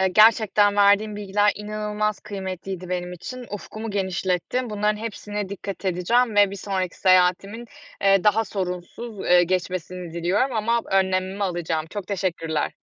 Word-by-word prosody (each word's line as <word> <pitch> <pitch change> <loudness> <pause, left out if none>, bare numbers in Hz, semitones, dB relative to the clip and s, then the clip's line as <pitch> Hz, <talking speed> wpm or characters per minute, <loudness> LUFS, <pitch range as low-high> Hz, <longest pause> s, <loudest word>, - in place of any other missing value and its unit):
Eee, 190 - +3
gerçekten 210 0 +5
verdiğin 205 +1 +4
bilgiler 205 0 +2
inanılmaz 210 0 -2
kıymetliydi 190 -2 -6
benim 180 0 -3
için. 250 +8 -8
Ufkumu 215 +2 -6
genişlettin. 190 +4 -1
Bunların 210 0 0
hepsine 210 -2 -5
dikkat 200 0 -7
edeceğim 205 +6 +1
ve 205 -1 +6
bir 200 - -6
sonraki 190 -2 -3
seyahatimin, 185 +5 +3 0.4
eee, 195 0 +4
daha 215 +2 +4
sorunsuz, 195 +3 -5
eee, 180 0 +6
geçmesini 180 -1 -3
diliyorum 195 +9 0
ama 230 +2 +1
önlemimi 190 +1 +1
alacağım. 165 -3 -2
Çok 205 -3 -5
teşekkürler. 175 -5 -2
195 Hz, 135 wpm, -23 LUFS, 185-210 Hz, 0.4 s, ve